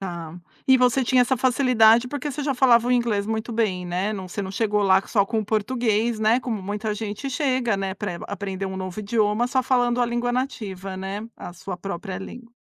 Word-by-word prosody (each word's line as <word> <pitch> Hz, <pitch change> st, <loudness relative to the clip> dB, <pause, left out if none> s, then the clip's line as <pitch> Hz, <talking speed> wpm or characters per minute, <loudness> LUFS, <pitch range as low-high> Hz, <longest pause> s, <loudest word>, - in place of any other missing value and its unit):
Ah, 170 Hz, -4 st, -6 dB, 0.3 s
e 265 Hz, 0 st, +7 dB
você 250 Hz, +1 st, +3 dB
tinha 255 Hz, +1 st, +3 dB
essa 260 Hz, +1 st, +1 dB
facilidade 245 Hz, -2 st, +4 dB
porque 290 Hz, +1 st, -4 dB
você 295 Hz, +2 st, -4 dB
já 280 Hz, -1 st, 0 dB
falava 245 Hz, -2 st, +4 dB
o -, -, +3 dB
inglês 225 Hz, -4 st, +1 dB
muito 220 Hz, +1 st, -3 dB
bem, 190 Hz, -6 st, 0 dB
né. 185 Hz, +4 st, -1 dB
Não 190 Hz, -3 st, -5 dB
você 200 Hz, +3 st, -5 dB
não 190 Hz, -, -5 dB
chegou 210 Hz, -1 st, 0 dB
lá 190 Hz, -1 st, +5 dB
só 200 Hz, -4 st, +2 dB
com 220 Hz, +2 st, -2 dB
o 215 Hz, -, -1 dB
português, 220 Hz, +1 st, 0 dB
né, 220 Hz, +4 st, +3 dB
como 225 Hz, -6 st, -3 dB
muita 210 Hz, +3 st, -3 dB
gente 215 Hz, +5 st, -5 dB
chega, 255 Hz, -5 st, 0 dB
né, 195 Hz, -1 st, -3 dB
pra 195 Hz, -4 st, -4 dB
aprender 195 Hz, -1 st, -4 dB
um 190 Hz, 0 st, -5 dB
novo 185 Hz, +1 st, -5 dB
idioma, 215 Hz, +2 st, +1 dB
só 260 Hz, 0 st, +1 dB
falando 245 Hz, -1 st, +2 dB
a 245 Hz, -, +3 dB
língua 240 Hz, +1 st, -1 dB
nativa, 195 Hz, -7 st, -4 dB
né, 195 Hz, +3 st, -5 dB
a 175 Hz, -, -8 dB
sua 180 Hz, +1 st, -7 dB
própria 190 Hz, 0 st, -5 dB
língua. 235 Hz, +4 st, -10 dB
220 Hz, 215 wpm, -24 LUFS, 195-245 Hz, 0.3 s, e